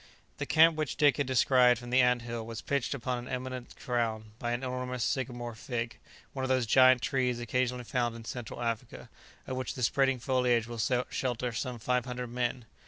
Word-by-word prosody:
The - - -3
camp 160 0 +6
which 155 -3 -2
Dick 145 -2 +4
had 145 -3 0
descried 125 -1 +5
from 120 +1 -9
the 130 +1 +5
ant 125 -1 +3
hill 120 -1 -4
was 115 0 -7
pitched 140 -1 -1
upon 125 -1 -2
an 120 - -8
eminence 130 -1 -5
crowned 110 -3 -2
by 120 - -2
an 120 +2 -2
enormous 125 -1 -3
sycamore 120 -3 -2
fig, 115 +1 -4 0.3
one 135 - -3
of 130 - -1
those 130 -2 +2
giant 130 +2 +6
trees 125 -3 0
occasionally 125 +1 -1
found 120 -1 -1
in 115 -1 -10
Central 120 0 -6
Africa, 115 -2 -4 0.3
of 130 - -4
which 130 - -3
the 125 - -4
spreading 135 +2 +3
foliage 125 -2 +1
will 120 0 -7 0.3
shelter 125 -1 -1
some 125 +1 -3
five 125 +2 0
hundred 125 -1 -5
men. 120 0 -2
125 Hz, 195 wpm, -30 LUFS, 120-130 Hz, 0.3 s, camp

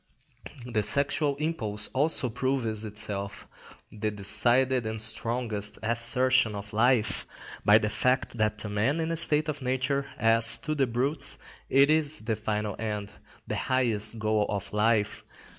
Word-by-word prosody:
The 115 -3 -1
sexual 140 +6 +1
impulse 120 -9 -3
also 140 -1 0
proves 115 -3 -2
itself 105 -1 -5 0.4
the 110 0 -3
decided 120 +5 +2
and 110 0 -4
strongest 110 -1 -2
assertion 120 0 +2
of 100 0 -8
life 115 0 +1 0.4
by 105 +1 +7
the 105 -1 -1
fact 125 +1 0
that 105 0 +1
to 105 - -7
man 110 +10 0
in 165 0 -2
a - - -1
state 155 -2 +2
of 150 -2 -4
nature, 130 +2 -1
as 115 0 +5
to 155 -2 -3
the 140 -3 +1
brutes, 130 +6 +2 0.3
it 140 +2 +4
is 155 -2 +1
the 110 0 -2
final 105 -1 -3
end, 105 -2 -4 0.3
the - - -4
highest 115 -4 +1
goal 110 -1 0
of 100 -1 -4
life. 105 0 +1
115 Hz, 145 wpm, -27 LUFS, 105-130 Hz, 0.4 s, by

